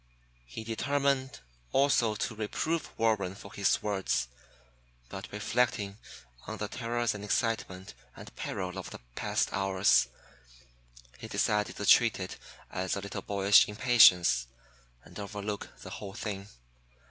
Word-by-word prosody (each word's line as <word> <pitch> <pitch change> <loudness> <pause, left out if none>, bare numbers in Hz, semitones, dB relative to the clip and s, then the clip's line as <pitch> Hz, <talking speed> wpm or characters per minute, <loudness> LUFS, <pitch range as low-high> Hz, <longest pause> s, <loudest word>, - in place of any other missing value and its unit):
He 60 - -7
determined 135 - 0 0.3
also 135 -5 +3
to 110 - -2
reprove 155 +10 -2
Warren 105 -5 +1
for 100 0 -12
his 100 -1 +1
words; 95 -12 0 0.8
but 95 0 -8
reflecting 105 -1 -1 0.5
on - - -5
the - - -3
terrors 120 -1 -1
and 105 -1 -7
excitement 105 - -2 0.2
and - - -12
peril 95 0 -4
of 95 - -7
the - - -8 0.2
past - - -1
hours, 95 0 +3 1.1
he - - -7
decided 105 0 0
to 105 - -4
treat 115 +1 +5
it 95 -1 -5 0.3
as 95 0 -2
a - - -3
little 100 0 -5
boyish 100 0 +5
impatience, 105 - +5 0.6
and - - -12
overlook 100 0 -5
the - - -9
whole 100 -2 -7
thing. 100 -3 -5
105 Hz, 130 wpm, -30 LUFS, 95-115 Hz, 1.1 s, treat